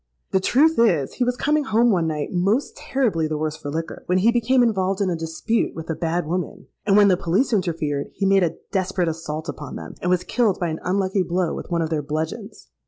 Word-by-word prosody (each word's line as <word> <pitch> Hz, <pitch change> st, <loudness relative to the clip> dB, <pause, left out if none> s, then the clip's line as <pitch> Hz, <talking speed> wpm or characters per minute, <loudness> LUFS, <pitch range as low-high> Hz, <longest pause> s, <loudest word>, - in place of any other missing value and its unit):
'The 190 Hz, -, +3 dB
truth 295 Hz, +10 st, +3 dB
is, 170 Hz, -, +3 dB
he 255 Hz, -, -1 dB
was 245 Hz, 0 st, 0 dB
coming 300 Hz, +1 st, +1 dB
home 235 Hz, -1 st, +3 dB
one 170 Hz, -5 st, +1 dB
night 150 Hz, -2 st, -2 dB
most 195 Hz, +9 st, 0 dB
terribly 220 Hz, -13 st, 0 dB
the 155 Hz, 0 st, -2 dB
worse 155 Hz, 0 st, -2 dB
for 145 Hz, -, -7 dB
liquor, 165 Hz, +3 st, -4 dB
when 180 Hz, -, +2 dB
he 215 Hz, +5 st, +4 dB
became 245 Hz, +2 st, +3 dB
involved 195 Hz, -4 st, +1 dB
in 195 Hz, -3 st, +1 dB
a -, -, 0 dB
dispute 165 Hz, +8 st, -1 dB
with 165 Hz, 0 st, -5 dB
a -, -, -2 dB
bad 170 Hz, +1 st, -1 dB
woman; 175 Hz, +3 st, -4 dB, 0.2 s
and 200 Hz, 0 st, +5 dB
when 205 Hz, -1 st, +7 dB
the 190 Hz, -, +5 dB
police 190 Hz, +9 st, 0 dB
interfered, 160 Hz, -7 st, -1 dB
he 200 Hz, -, -1 dB
made 195 Hz, 0 st, +4 dB
a 165 Hz, -1 st, 0 dB, 0.2 s
desperate 190 Hz, -2 st, 0 dB
assault 160 Hz, -1 st, -4 dB
upon 145 Hz, -1 st, -6 dB
them, -, -, -8 dB
and 180 Hz, -, -1 dB
was 180 Hz, 0 st, +2 dB
killed 225 Hz, -5 st, +1 dB
by 175 Hz, -, -1 dB
an 160 Hz, -, -4 dB
unlucky 190 Hz, +1 st, 0 dB
blow 180 Hz, -1 st, 0 dB
with -, -, -7 dB
one 170 Hz, -1 st, 0 dB
of 160 Hz, -, -4 dB
their 155 Hz, -2 st, 0 dB
bludgeons.' 160 Hz, +9 st, -5 dB
180 Hz, 235 wpm, -22 LUFS, 160-215 Hz, 0.2 s, when